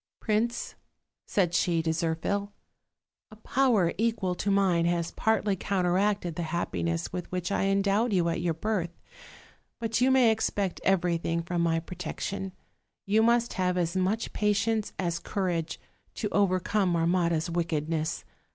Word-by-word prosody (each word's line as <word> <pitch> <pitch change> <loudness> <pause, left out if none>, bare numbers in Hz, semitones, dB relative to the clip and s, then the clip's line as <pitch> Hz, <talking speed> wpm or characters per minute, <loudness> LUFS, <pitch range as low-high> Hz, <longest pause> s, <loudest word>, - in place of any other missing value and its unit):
"Prince," 225 +2 -1 0.5
said 180 -4 +1
she 170 -2 +2
to 160 - +1
Zirphil, 165 +5 -1 0.8
"a 215 - -13
power 220 -5 +2
equal 220 -5 +1
to 190 +3 -2
mine 190 -4 +3
has 170 -1 0
partly 215 -2 +1
counteracted 190 0 0
the 175 - -3
happiness 85 - -2
with 180 - -5
which 180 0 -2
I 195 - +1
endowed 200 +4 +2
you 180 -4 +2
at 165 - -1
your 170 -2 0
birth; 185 -1 -1 0.9
but 225 0 -1
you 255 - +5
may 260 -3 +5
expect 205 -3 -1
everything 170 -3 +1
from 170 0 -1
my 165 -1 +2
protection; 180 +3 -5 0.5
you 210 +2 +3
must 235 +1 +3
have 180 -1 0
as 170 -1 0
much 190 +5 0
patience 210 +1 +1
as 170 -2 -1
courage, 180 -5 -2 0.4
to 210 - -2
overcome 190 -1 +1
Marmotta's 170 -1 +1
wickedness. 160 -2 -1
185 Hz, 140 wpm, -28 LUFS, 170-210 Hz, 0.9 s, you